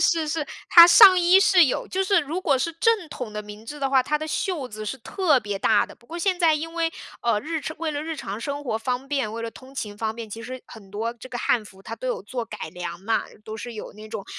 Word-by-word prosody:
是 330 -1 +2
是。 315 0 -1 0.2
它 340 -1 +11
上 370 +1 +9
衣 355 +2 +6
是 380 -4 +6
有 255 - -2
就 380 - 0
是 385 -1 +3
如 320 +5 -4
果 275 - +2
是 335 +6 -1
正 415 +1 +1
统 250 -7 -7
的 210 - -4
明 210 +1 -11
制 295 +6 -8
的 275 - 0
话， 265 -1 +4
它 300 +3 -1
的 310 - -5
袖 315 -2 -2
子 215 0 -7
是 265 +5 -4
特 315 - +1
别 205 -4 -4
大 210 +1 +3
的。 - - -13
不 235 - -26
过 340 +1 -7
现 370 0 0
在 330 -3 +4
因 330 +2 -5
为， 330 -1 0 0.3
呃， 235 -3 +2
日 320 +4 -3
常 315 +2 -6
为 325 -2 -2
了 290 0 -3
日 320 0 -5
常 210 -5 -6
生 285 +3 -4
活 230 -5 -1
方 250 +3 -3
便、 270 -7 -2
为 230 - -5
了 230 - -4
通 260 +3 -15
勤 210 -5 -5
方 220 0 -2
便， 230 -1 -7
其 225 +2 -8
实 255 +2 -8
很 200 -4 -14
多 225 +3 -3
这 240 +2 -12
个 245 - -5
汉 235 -2 +1
服 190 -2 -15
它 225 - -6
都 255 +3 -5
有 - - -2
做 240 +4 -4
改 215 -7 -7
良 175 0 -6
嘛， 225 +4 0 0.2
都 220 +1 -7
是 240 0 -7
有 215 - -8
那 215 +1 -12
种， 200 - -6
255 Hz, 295 characters per minute, -24 LUFS, 220-325 Hz, 0.3 s, 它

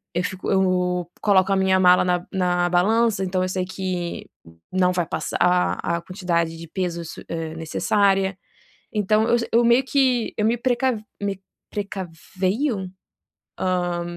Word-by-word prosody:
eu 175 - +1
fico 190 0 -3
eu 180 -2 +1
coloco 195 -2 +3
a - - +3
minha 190 0 +3
mala 180 -1 +6
na 180 -1 0
na 180 -2 +1
balança, 215 +4 +2
então 185 0 0
eu 185 - -1
sei 185 0 -1
que 185 -2 -4 0.4
não 185 -1 +2
vai 175 -1 0
passar - - -3 0.5
a 170 0 0
quantidade 170 -3 -1
de 165 0 -9
peso 170 0 -3
s 165 - -9
eh, 165 -1 -4
necessária. 195 +4 +1 0.6
Então 215 +1 +2
eu 240 - +4
j 235 - -3
eu 235 +1 +4
meio 235 +3 +5
que 260 -4 +1
eu 210 - +1
me 230 +2 +2
precav 250 0 0 0.2
me 200 -2 -2 0.3
precaveio? 195 - -3 0.7
Ah, 175 -2 -1
185 Hz, 150 wpm, -23 LUFS, 180-205 Hz, 0.7 s, mala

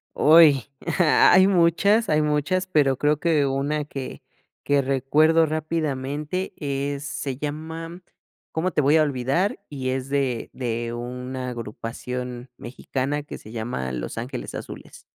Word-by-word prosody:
Uy, 150 -4 +6 0.4
hay 180 +3 +6
muchas 195 +5 +3
hay 155 0 +3
muchas, 150 +5 0
pero, 145 -7 +2
creo 150 +2 +2
que 160 -4 +2
una 140 +2 -1
que 135 -3 -7 0.4
que 145 -1 +2
recuerdo 145 +5 +3
rápidamente 155 +1 -3
es 140 0 -3
se 140 -2 -4
llama, 160 +4 -6 0.5
¿cómo 175 +3 -1
te 150 - +1
voy 145 +3 +4
a 155 - +5
olvidar? 140 +7 0
Y 130 -3 -4
es 130 +1 -3
de 135 -4 -1
de 120 -2 -3
una 125 +1 -5
agrupación 125 +2 -6
mexicana 135 +4 -3
que 145 - -8
se 110 - -13
llama 110 - -4
Los - - -5
Ángeles 125 +2 -5
Azules. - - -9
140 Hz, 135 wpm, -24 LUFS, 130-155 Hz, 0.5 s, Uy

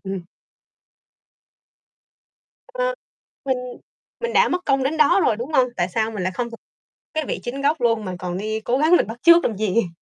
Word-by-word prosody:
Ừm. 190 -2 -5 2.4
Ờ, - - -2 0.5
mình 265 -2 0 0.6
mình 470 0 -2
đã - - +4
mất 360 0 -2
công 275 -1 +2
đến 285 +4 -1
đó 330 +5 +4
rồi, 215 - +2
đúng 250 +7 -6
hông? 255 -3 +4
Tại 175 - 0
sao 220 +4 -1
mình 210 -4 -5
lại 185 +1 -1
không 235 +4 -3
thử 230 - -9 0.6
cái 315 -1 -1
vị - - -3
chính 265 +3 -5
gốc 290 +1 +1
luôn 230 -3 +1
mà 185 -1 -4
còn 180 -1 -4
đi 215 +2 -3
cố 245 +4 0
gắng 315 +5 +4
mình - - 0
bắt 225 +2 -7
chước 340 0 +7
làm 220 - -1
gì? 215 -1 +1
240 Hz, 200 wpm, -22 LUFS, 215-310 Hz, 2.4 s, chước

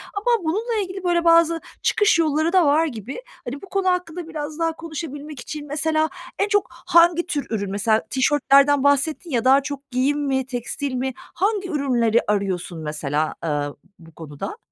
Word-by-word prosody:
Ama 450 -1 +1
bununla 430 +7 -1
ilgili 375 0 -7
böyle 345 -1 +2
bazı 335 0 +4 0.2
çıkış 425 -5 +3
yolları 315 +2 +1
da 365 -4 +5
var 305 +3 +4
gibi. 250 - -6 0.2
Hani, 270 +4 -6
bu 390 - -12
konu 385 -1 +1
hakkında 355 -2 -2
biraz 310 -1 -6
daha 330 -1 +1
konuşabilmek 305 -3 -7
için 295 +3 -7
mesela 310 +2 0 0.3
en 400 - +2
çok 410 -1 +1
hangi 340 0 +3
tür 290 -5 -2
ürün? 200 -3 -2
Mesela 215 +2 +2
tişörtlerden 280 +1 +4
bahsettin 285 +4 +1
ya, 245 -2 0
daha 270 +2 +6
çok 280 0 -7
giyim 265 +4 +1
mi, 265 -2 0
tekstil 255 +2 -4
mi 260 +1 -2
hangi 395 0 -2
ürünleri 245 -7 +2
arıyorsun 190 -4 -1
mesela, 150 0 -2
eee, 165 - -1 0.5
bu 165 -1 -15
konuda? 155 - -7
295 Hz, 165 wpm, -22 LUFS, 250-340 Hz, 0.5 s, daha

